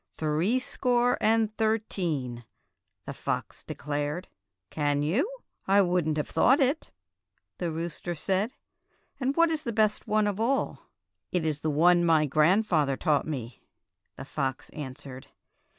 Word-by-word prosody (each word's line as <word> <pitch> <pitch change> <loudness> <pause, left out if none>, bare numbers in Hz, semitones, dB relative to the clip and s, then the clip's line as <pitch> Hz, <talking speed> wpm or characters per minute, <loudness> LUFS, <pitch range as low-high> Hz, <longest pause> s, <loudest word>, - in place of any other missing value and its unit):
'^ - - -32
"Threescore 240 - +1
and 220 -1 +2
thirteen," 175 - -1 0.6
the - - -5
fox - - -4
de - - -7
clared. 145 +4 -3 0.2
" 90 0 -59
Can 145 -1 0
you? 215 - +1 0.4
I 200 +1 +5
would 175 -3 +1
n't 155 -1 0
have 150 - -1
thought 265 +5 +4
it," 275 +3 +1 0.7
the 175 -2 -1
rooster 170 +1 -4
said; 195 +7 0 0.7
"and 270 +1 0
what 335 0 +4
is 310 -1 -2
the 235 - -2
best 215 -1 +1
one 215 0 +2
of 205 0 -1
all.?" 260 +5 -1 0.4
"It 180 -3 0
is 150 -2 -2
one 170 +3 +4
my 160 -2 +4
grandfather 155 -1 +2
taught 150 -4 +1
me," 125 -6 -5 0.5
the - - -8
fox 135 -2 -3
answered. 130 -2 -8
175 Hz, 145 wpm, -28 LUFS, 150-220 Hz, 0.7 s, I